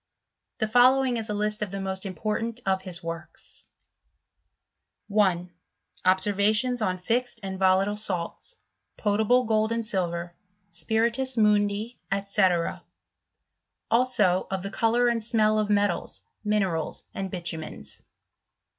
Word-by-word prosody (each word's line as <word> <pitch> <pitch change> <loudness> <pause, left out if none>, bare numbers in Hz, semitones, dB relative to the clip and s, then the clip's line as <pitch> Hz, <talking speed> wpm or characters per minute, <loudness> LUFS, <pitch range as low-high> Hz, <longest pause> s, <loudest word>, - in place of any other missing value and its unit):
Tha 220 - 0
following 250 +2 +4
is 220 -1 -3
a - - -1
list 210 +1 -1
of 210 - -2
the 195 +1 -5
most 190 0 -3
important 220 +4 -3
of 190 -1 +1
his 180 -3 -2
works: 165 0 -8 1.4
1. 185 -4 +1 0.5
Observations 210 +6 +3
on 185 -3 0
fixed 235 +6 -1
and 190 -1 -5
volatile 190 +2 +3
Salts, 200 - -2 0.4
potable 220 +4 +2
Gold 220 -1 +1
and 230 -1 -1
Silver, 175 -4 -2 0.4
Spiritus 230 +8 0
Mundi, 210 +1 +1 0.3
Sec.; 190 -4 +1 1.1
also 215 -7 +3
of 190 -1 -3
the 200 - -5
colour 235 +2 +2
and 235 -2 0
smell 215 -1 +2
of 210 -1 -1
metals, 205 -4 0 0.2
minerals, 195 -7 -1
and 195 -1 -4
bitumens. 160 - -5
205 Hz, 120 wpm, -26 LUFS, 185-225 Hz, 1.4 s, following